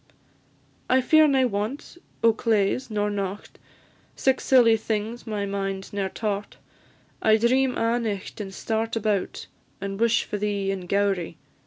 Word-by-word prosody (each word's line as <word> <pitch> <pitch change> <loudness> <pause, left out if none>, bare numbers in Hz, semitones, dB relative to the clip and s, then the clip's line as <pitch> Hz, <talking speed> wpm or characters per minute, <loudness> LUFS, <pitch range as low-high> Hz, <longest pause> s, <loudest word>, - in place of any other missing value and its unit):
"I 260 - +5
fear 310 +4 +5
nae 265 -2 +3
want 220 +8 -3 0.3
o' 230 -1 +6
claes 225 +2 0
nor 210 -1 -1
nocht, 200 0 -5 0.6
Sic 265 -1 +1
silly 240 -4 +5
things 220 +2 -3
my 210 -2 -2
mind 195 -1 -4
ne'er 195 -1 -1
taught; 205 0 -4 0.6
I 220 0 +5
dream 255 +3 +2
a' 230 +1 +1
nicht, 210 -2 -4
and 195 -2 -6
start 225 +3 -2
about, 210 -3 -1 0.3
And 195 0 -5
wish 230 0 +3
for 210 - -5
thee 200 -1 -1
in 185 -2 -5
Gowrie. 200 -3 0
210 Hz, 145 wpm, -25 LUFS, 200-230 Hz, 0.6 s, o